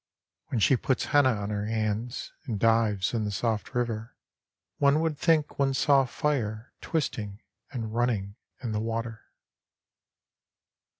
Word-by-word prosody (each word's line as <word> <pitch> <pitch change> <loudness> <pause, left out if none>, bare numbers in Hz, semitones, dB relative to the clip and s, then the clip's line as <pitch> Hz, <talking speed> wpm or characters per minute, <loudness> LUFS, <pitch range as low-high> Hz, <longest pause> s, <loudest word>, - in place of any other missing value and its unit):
When 120 - -1
she 125 +5 +5
puts 130 +1 0
henna 145 -2 +6
on 100 0 -4
her 105 0 -2
hands 110 +2 -2
and 110 -5 -3
dives 110 -3 +2
in 115 -2 0
the 105 - -1
soft 110 +4 -2
river 115 -2 -2 0.6
One 140 +1 +4
would 160 -1 0
think 155 -1 +2
one 135 -1 +2
saw 135 0 +4
fire 120 -5 -2
twisting 105 - -2 0.3
and 115 -5 -4
running 115 -5 0 0.3
in 120 - -2
the 105 - -1
water. 115 0 -3
115 Hz, 135 wpm, -28 LUFS, 105-135 Hz, 0.6 s, henna